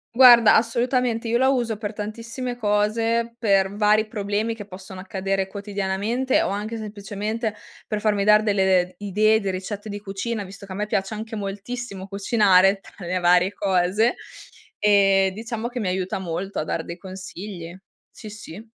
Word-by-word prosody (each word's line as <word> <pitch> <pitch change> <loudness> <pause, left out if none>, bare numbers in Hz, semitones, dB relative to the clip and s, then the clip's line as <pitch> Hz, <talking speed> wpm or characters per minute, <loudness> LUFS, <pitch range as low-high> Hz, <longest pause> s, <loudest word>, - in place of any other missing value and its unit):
Guarda, 240 -3 +8
assolutamente, 235 0 +1
io 235 +2 +1
la 265 - +4
uso 240 -4 0
per 205 -1 -4
tantissime 230 +4 -5
cose, 230 +2 0
per 195 -3 +2
vari 210 +1 +3
problemi 210 +1 -2
che 210 -2 -9
possono 190 0 -10
accadere 195 0 -2
quotidianamente 200 +5 -1
o - - -1
anche 210 +3 -3
semplicemente 215 +1 -4 0.3
per 210 -1 -2
farmi 210 -2 +1
dare 210 +1 +5
delle, 190 -3 +3
ehm, 180 +1 -8
idee 215 +2 +2
di 200 -3 -3
ricette 195 +3 -5
di 205 0 -5
cucina, 205 +2 -4
visto 200 +1 -11
che - - -11
a - - -5
me 210 +2 -1
piace 195 0 -2
anche 220 +1 -6
moltissimo 200 0 -5
cucinare, 195 -1 +3
tra 195 -2 -12
le 185 +1 0
varie 180 +2 +3
cose; 195 +5 +1 0.6
ehm, 195 -2 +4
diciamo 225 +2 -4
che 245 0 -5
mi 210 - -2
aiuta 185 +1 -2
molto 190 +2 -4
a - - 0
dar 160 +1 -3
dei 170 - -7
consigli. 185 -1 -8 0.4
Sì, 215 - -10
sì. 210 -2 -10
205 Hz, 165 wpm, -23 LUFS, 195-225 Hz, 0.6 s, Guarda